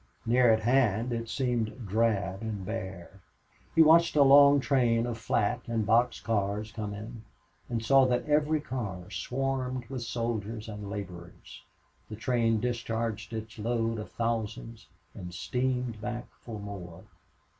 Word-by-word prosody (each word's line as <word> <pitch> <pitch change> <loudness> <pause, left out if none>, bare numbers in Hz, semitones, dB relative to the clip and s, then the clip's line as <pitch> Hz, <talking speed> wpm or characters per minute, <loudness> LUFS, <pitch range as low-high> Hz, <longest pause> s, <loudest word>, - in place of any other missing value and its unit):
Near 120 +1 +5
at 110 0 +3
hand 120 -1 +2
it 115 -1 -4
seemed 120 -1 -2
drab 100 -2 0
and 105 -4 -4
bare. 95 -3 -6 0.5
He 165 - +8
watched 165 +1 +5
a 145 - +7
long 140 +1 +7
train 120 -4 +2
of 120 -1 -3
flat 115 +1 0
and 115 -2 -1
box 115 +3 +3
cars 105 0 -1
come 105 -2 -5
in, 110 +2 -8 0.5
and 115 -2 -2
saw 135 +1 +6
that 125 -1 0
every 150 +1 +2
car 100 -10 -5
swarmed 130 -1 -2
with 130 -2 -4
soldiers 115 -2 -3
and 105 -2 -7
laborers. 85 -10 -8 0.5
The 110 - -6
train 115 0 +1
discharged 115 -2 -2
its 110 0 -6
load 115 0 -1
of 105 - -7
thousands, 115 0 -3 0.3
and 90 -3 -8
steamed 125 0 -2
back 120 +1 -4 0.2
for 110 -3 -7
more. 95 -5 -8
115 Hz, 145 wpm, -29 LUFS, 105-125 Hz, 0.5 s, He